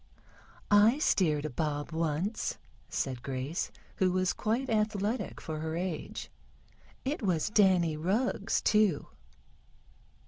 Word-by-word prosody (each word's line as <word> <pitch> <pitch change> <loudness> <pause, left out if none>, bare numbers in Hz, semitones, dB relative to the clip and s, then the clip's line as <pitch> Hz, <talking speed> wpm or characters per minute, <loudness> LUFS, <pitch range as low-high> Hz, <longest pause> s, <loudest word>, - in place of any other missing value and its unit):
"I 210 +5 +6
steered 155 - +2
a - - -1
bob 145 +2 -2
once," 165 +6 -1 0.3
said 130 -3 -2
Grace, 135 +5 -3 0.3
who 185 -1 +3
was 185 0 +1
quite 235 +5 -1
athletic 215 0 -1
for 155 -1 -5
her 160 +1 -3
age. 175 -2 -4 0.7
"It 280 +3 -1
was 185 -2 0
Danny 185 -6 +4
Rugg's, 200 +6 0
too." 210 -8 +3
185 Hz, 110 wpm, -30 LUFS, 155-215 Hz, 0.7 s, I